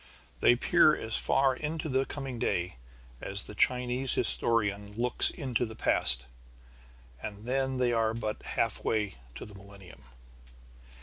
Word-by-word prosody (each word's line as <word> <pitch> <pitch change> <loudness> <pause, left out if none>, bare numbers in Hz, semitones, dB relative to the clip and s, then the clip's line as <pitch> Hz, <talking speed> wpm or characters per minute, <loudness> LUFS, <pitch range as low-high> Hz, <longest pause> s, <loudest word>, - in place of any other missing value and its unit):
They 120 - +4
peer 155 +4 +3
as 110 -1 -5
far 135 -1 +1
into 155 +3 -5
the 135 -1 -1
coming 135 -4 -6
day 90 - -2 0.4
as 100 +1 -3
the - - -11
Chinese 125 +4 +2
historian 105 -4 +3
looks 120 +2 +1
into 130 -5 -3
the 110 -2 -6
past. - - +3 1.0
And 105 +4 -8
then 130 +1 -1
they 125 -1 +1
are 115 -1 0
but 110 -2 -5
halfway 105 - -2 0.2
to - - -8
the 105 - -14
millennium. 100 -5 -14
115 Hz, 135 wpm, -28 LUFS, 105-130 Hz, 1.0 s, They